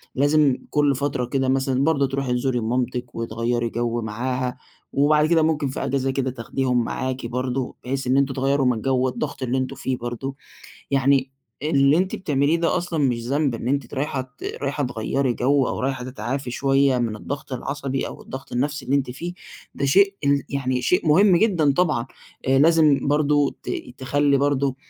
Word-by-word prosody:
لازم 145 Hz, -1 st, +3 dB
كُلّ 145 Hz, -2 st, +2 dB
فترة 140 Hz, -2 st, -1 dB
كده 130 Hz, +1 st, 0 dB
مثلًا 135 Hz, 0 st, +1 dB
برضه 140 Hz, -3 st, +2 dB
ترُوحي 135 Hz, -1 st, -2 dB
تزوري 125 Hz, 0 st, 0 dB
مامتِك، 125 Hz, +2 st, -2 dB
وتغيّري 115 Hz, +1 st, -1 dB
جو 120 Hz, 0 st, -2 dB
معاها، 125 Hz, +3 st, -3 dB, 0.4 s
وبعد 150 Hz, +2 st, +4 dB
كده 165 Hz, 0 st, +3 dB
ممكن 155 Hz, -2 st, +1 dB
في 135 Hz, -, -4 dB
أجازة 135 Hz, 0 st, 0 dB
كده 130 Hz, -1 st, -1 dB
تاخديهم 125 Hz, 0 st, -1 dB
معاكِ 130 Hz, +1 st, -3 dB
برضه، 125 Hz, +1 st, -2 dB
بحيث 135 Hz, +1 st, -3 dB
إن 130 Hz, +2 st, +3 dB
أنتم 140 Hz, -1 st, +2 dB
تغيّروا 135 Hz, +1 st, +1 dB
من 125 Hz, -, +4 dB
الجو 130 Hz, +3 st, 0 dB
والضغط 130 Hz, +2 st, -2 dB
اللي 130 Hz, +1 st, 0 dB
أنتم 130 Hz, 0 st, -2 dB
فيه 130 Hz, -1 st, -2 dB
برضه، 120 Hz, +3 st, -5 dB, 0.6 s
يعني 135 Hz, -1 st, +2 dB, 0.3 s
اللي 140 Hz, -1 st, +3 dB
أنتِ 185 Hz, +1 st, 0 dB
بتعمليه 145 Hz, -2 st, +1 dB
ده 170 Hz, +1 st, +1 dB
أصلًا 175 Hz, -2 st, -2 dB
مش 120 Hz, -2 st, -1 dB
ذنب، 140 Hz, 0 st, +1 dB
إن 115 Hz, +1 st, -4 dB
أنتِ 140 Hz, -1 st, 0 dB
ت -, -, -10 dB
رايحة 140 Hz, 0 st, -1 dB
ت 130 Hz, +1 st, -15 dB, 0.2 s
رايحة 145 Hz, +1 st, -1 dB
تغيّري 125 Hz, +2 st, -1 dB
جو، 135 Hz, +2 st, +2 dB
أو -, -, -3 dB
رايحة 130 Hz, -1 st, -2 dB
تتعافي 130 Hz, +2 st, -4 dB
شوية 135 Hz, 0 st, +2 dB
من 115 Hz, -3 st, -1 dB
الضغط 140 Hz, +5 st, -6 dB
العصبي، 135 Hz, +1 st, -3 dB
أو -, -, -9 dB
الضغط 135 Hz, +1 st, -9 dB
النفسي 140 Hz, +3 st, -1 dB
اللي 140 Hz, -, +2 dB
أنتِ 135 Hz, -3 st, -1 dB
فيه، 170 Hz, +8 st, -5 dB, 0.4 s
ده -, -, -2 dB
شيء 195 Hz, +8 st, +4 dB
ال 140 Hz, 0 st, +3 dB
يعني 130 Hz, -2 st, -1 dB
شيء 180 Hz, -3 st, +2 dB
مهم 185 Hz, +4 st, +6 dB
جدًا 170 Hz, -8 st, +3 dB
طبعًا، 150 Hz, -7 st, +1 dB, 0.4 s
آآ 135 Hz, 0 st, +4 dB
لازم 155 Hz, -2 st, +4 dB
برضه 145 Hz, -1 st, +2 dB
ت -, -, -5 dB, 0.3 s
تخلّي 140 Hz, +2 st, +2 dB
برضه 140 Hz, -1 st, +1 dB
135 Hz, 180 wpm, -23 LUFS, 125-145 Hz, 0.6 s, مهم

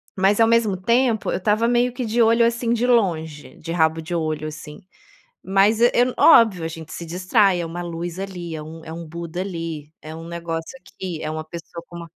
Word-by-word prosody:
Mas 195 Hz, +2 st, +2 dB
ao 225 Hz, -, +6 dB
mesmo 225 Hz, -4 st, +2 dB
tempo, 235 Hz, +3 st, +1 dB
eu -, -, 0 dB
estava 210 Hz, +4 st, +1 dB
meio 245 Hz, +1 st, +2 dB
que 250 Hz, 0 st, -4 dB
de 230 Hz, +2 st, +1 dB
olho, 230 Hz, +1 st, +5 dB
assim, 235 Hz, 0 st, 0 dB
de 235 Hz, +1 st, +1 dB
longe, 165 Hz, -11 st, 0 dB
de 165 Hz, -, -8 dB
rabo 160 Hz, -1 st, +2 dB
de 170 Hz, +2 st, -6 dB
olho, 155 Hz, -2 st, -2 dB
assim. 155 Hz, +1 st, -9 dB, 0.6 s
Mas 195 Hz, +3 st, +3 dB
eu 240 Hz, -, +6 dB, 0.3 s
óbvio, 220 Hz, -, +6 dB
a 160 Hz, -, -2 dB
gente 160 Hz, -1 st, -9 dB
se 170 Hz, -, -7 dB
distrai, 185 Hz, +2 st, +2 dB
é -, -, -3 dB
uma 170 Hz, +2 st, -6 dB
luz 170 Hz, +1 st, -5 dB
ali, 180 Hz, -4 st, -6 dB
é 155 Hz, -, -5 dB
um 160 Hz, +1 st, -10 dB
é 160 Hz, -, -8 dB
um 165 Hz, 0 st, -7 dB
Buda 170 Hz, +1 st, -6 dB
ali, 165 Hz, -5 st, -5 dB
é 155 Hz, +1 st, -8 dB
um 165 Hz, +1 st, -9 dB
negócio 170 Hz, +4 st, -5 dB
aqui, 180 Hz, -9 st, -7 dB
é 155 Hz, -, -3 dB
uma 155 Hz, 0 st, -4 dB
pessoa 170 Hz, +1 st, -9 dB
com 175 Hz, -, -10 dB
uma 170 Hz, -1 st, -9 dB
175 Hz, 215 wpm, -22 LUFS, 165-220 Hz, 0.6 s, ao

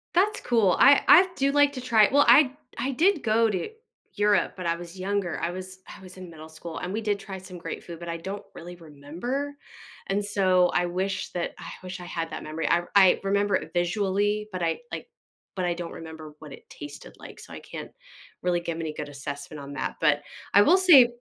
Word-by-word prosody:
That's 415 Hz, +4 st, +2 dB
cool, 225 Hz, -7 st, +2 dB
I 280 Hz, +1 st, +7 dB
I've 365 Hz, +2 st, +7 dB
do 275 Hz, +1 st, +1 dB
like 290 Hz, 0 st, +4 dB
to 255 Hz, -, -6 dB
try 220 Hz, -5 st, +4 dB
well, 285 Hz, +1 st, +5 dB
I 275 Hz, -3 st, +6 dB, 0.2 s
I 260 Hz, +4 st, -1 dB
did 330 Hz, +5 st, +2 dB
go 225 Hz, 0 st, +2 dB
to 195 Hz, -, -2 dB, 0.4 s
Europe, 205 Hz, 0 st, +2 dB
but 185 Hz, -2 st, -7 dB
I 170 Hz, 0 st, 0 dB
was 175 Hz, +2 st, -10 dB
younger. 195 Hz, -1 st, -2 dB
I 170 Hz, -, -1 dB
was 185 Hz, +1 st, -8 dB
I -, -, -11 dB
was 185 Hz, 0 st, -12 dB
in 185 Hz, -2 st, -9 dB
middle 160 Hz, -1 st, -11 dB
school, 160 Hz, +1 st, -9 dB
and 180 Hz, +2 st, -5 dB
we 220 Hz, -, -2 dB
did 205 Hz, -2 st, -1 dB
try 195 Hz, -1 st, -8 dB
some 185 Hz, -1 st, -10 dB
great -, -, -7 dB
food, 170 Hz, -1 st, -9 dB
but 170 Hz, -, -8 dB
I 170 Hz, -, -3 dB
don't 195 Hz, +4 st, -6 dB
really 175 Hz, +1 st, -9 dB
remember, 170 Hz, -, -5 dB, 0.5 s
and 200 Hz, +1 st, 0 dB
so 185 Hz, -3 st, +3 dB
I 175 Hz, -, +2 dB
wish 185 Hz, +2 st, -3 dB
that 175 Hz, -1 st, -2 dB
I -, -, -8 dB
wish 185 Hz, 0 st, -7 dB
I 175 Hz, -, -9 dB
had 165 Hz, -1 st, -4 dB
that -, -, -6 dB
memory. 155 Hz, +1 st, -4 dB
I 175 Hz, 0 st, +3 dB
I 190 Hz, -2 st, +6 dB
remember 200 Hz, 0 st, +1 dB
it -, -, -3 dB
visually, 200 Hz, +3 st, 0 dB
but 180 Hz, -2 st, -3 dB
I, 165 Hz, -1 st, 0 dB
like -, -, -6 dB, 0.5 s
but 180 Hz, -, 0 dB
I 175 Hz, -, +1 dB
don't 170 Hz, -1 st, -6 dB
remember 160 Hz, -2 st, -10 dB
what 150 Hz, -3 st, -11 dB
it -, -, -15 dB
tasted 145 Hz, 0 st, -10 dB
like, -, -, -12 dB
so -, -, -12 dB
I -, -, -7 dB
can't -, -, -9 dB, 0.5 s
really 175 Hz, -1 st, +1 dB
give 170 Hz, -1 st, -4 dB
any 160 Hz, -2 st, -4 dB
good 150 Hz, -1 st, -6 dB
assessment 145 Hz, +1 st, -7 dB
on 140 Hz, +1 st, -9 dB
that. -, -, -3 dB
But 150 Hz, -2 st, +3 dB, 0.3 s
I 205 Hz, -, +7 dB
will 350 Hz, -, +5 dB
say 295 Hz, -10 st, +7 dB
185 Hz, 225 wpm, -26 LUFS, 170-210 Hz, 0.5 s, I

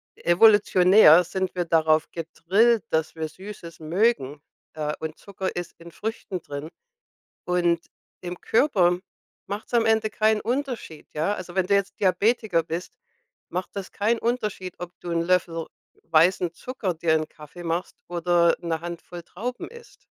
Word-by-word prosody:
evolutionär 185 Hz, -2 st, +6 dB
sind 185 Hz, +1 st, -3 dB
wir 175 Hz, -1 st, -1 dB
darauf 160 Hz, -1 st, +3 dB
gedrillt, 190 Hz, +7 st, +2 dB
dass 160 Hz, 0 st, 0 dB
wir 160 Hz, -1 st, -3 dB
Süßes 175 Hz, -1 st, -10 dB
mögen, 155 Hz, -, 0 dB, 0.3 s
äh, 150 Hz, -1 st, -2 dB
und 160 Hz, 0 st, -5 dB
Zucker 190 Hz, -1 st, -5 dB
ist 175 Hz, 0 st, -5 dB
in 170 Hz, 0 st, -13 dB
Früchten 205 Hz, -4 st, -5 dB
drin. 145 Hz, +2 st, -7 dB, 0.8 s
Und 175 Hz, -1 st, +1 dB, 0.4 s
im 175 Hz, 0 st, -7 dB
Körper 185 Hz, -9 st, +3 dB, 0.5 s
macht's 205 Hz, +4 st, -6 dB
am 230 Hz, -, +4 dB
Ende 220 Hz, -1 st, +2 dB
keinen 215 Hz, 0 st, +2 dB
Unterschied, 245 Hz, -, -4 dB
ja? 155 Hz, +6 st, 0 dB
Also, 180 Hz, -3 st, -8 dB
wenn 190 Hz, -1 st, +1 dB
du 200 Hz, -, +4 dB
jetzt 200 Hz, -1 st, 0 dB
Diabetiker 200 Hz, -2 st, +2 dB
bist, 170 Hz, +3 st, -6 dB, 0.5 s
macht 180 Hz, +1 st, -3 dB
das 195 Hz, -1 st, -6 dB
keinen 225 Hz, +3 st, +1 dB
Unterschied, 210 Hz, -7 st, -2 dB
ob 175 Hz, -1 st, -6 dB
du 175 Hz, -, -6 dB
'n 165 Hz, 0 st, +1 dB
Löffel 170 Hz, -2 st, 0 dB, 0.4 s
weißen 170 Hz, +2 st, +3 dB
Zucker 230 Hz, -3 st, -4 dB
dir 160 Hz, 0 st, +1 dB
in 155 Hz, 0 st, 0 dB
Kaffee 155 Hz, +4 st, -12 dB
machst 170 Hz, +2 st, -2 dB
oder 175 Hz, -1 st, +3 dB
'ne 165 Hz, -1 st, -2 dB
Handvoll 175 Hz, 0 st, -7 dB
Trauben 240 Hz, +9 st, -6 dB
isst. 470 Hz, 0 st, -16 dB
180 Hz, 150 wpm, -25 LUFS, 165-205 Hz, 0.8 s, evolutionär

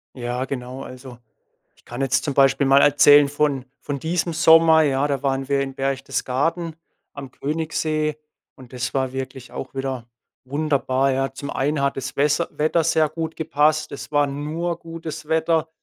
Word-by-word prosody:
Ja, 125 Hz, 0 st, -3 dB
genau, 130 Hz, 0 st, -6 dB
also, 130 Hz, -1 st, -11 dB, 0.6 s
ich -, -, -27 dB
kann 120 Hz, +2 st, -8 dB
jetzt 135 Hz, 0 st, +1 dB
zum 140 Hz, -, -2 dB
Beispiel 135 Hz, 0 st, +4 dB
mal 135 Hz, +1 st, +6 dB
erzählen 145 Hz, 0 st, +6 dB
von 145 Hz, -2 st, 0 dB, 0.2 s
von 145 Hz, -1 st, -3 dB
diesem 170 Hz, +3 st, -1 dB
Sommer, 160 Hz, 0 st, +6 dB
ja, 140 Hz, -1 st, +1 dB
da 140 Hz, -1 st, -2 dB
waren 135 Hz, -1 st, -1 dB
wir 140 Hz, -1 st, +1 dB
in 135 Hz, -1 st, -3 dB
Berchtesgaden 135 Hz, +4 st, -2 dB, 0.4 s
am 135 Hz, -2 st, -9 dB
Königssee 155 Hz, 0 st, -2 dB, 0.4 s
und 130 Hz, -2 st, -15 dB
das 125 Hz, -1 st, -4 dB
war 130 Hz, -1 st, 0 dB
wirklich 130 Hz, -1 st, -6 dB
auch -, -, -7 dB
wieder 135 Hz, -3 st, -4 dB, 0.4 s
wunderbar, 135 Hz, -1 st, 0 dB
ja. 135 Hz, +1 st, -1 dB
Zum 140 Hz, +1 st, -6 dB
einen 145 Hz, +1 st, -1 dB
hat 140 Hz, 0 st, 0 dB
das 130 Hz, -1 st, -5 dB
Wesser 145 Hz, +4 st, +2 dB
Wetter 155 Hz, +2 st, +1 dB
sehr 160 Hz, -1 st, +2 dB
gut 160 Hz, +1 st, -5 dB
gepasst. 155 Hz, 0 st, +1 dB
Es 140 Hz, -, -8 dB
war 145 Hz, -1 st, +3 dB
nur 160 Hz, +5 st, -3 dB
gutes 165 Hz, -2 st, -8 dB
Wetter. 160 Hz, 0 st, +1 dB
140 Hz, 165 wpm, -22 LUFS, 135-155 Hz, 0.6 s, mal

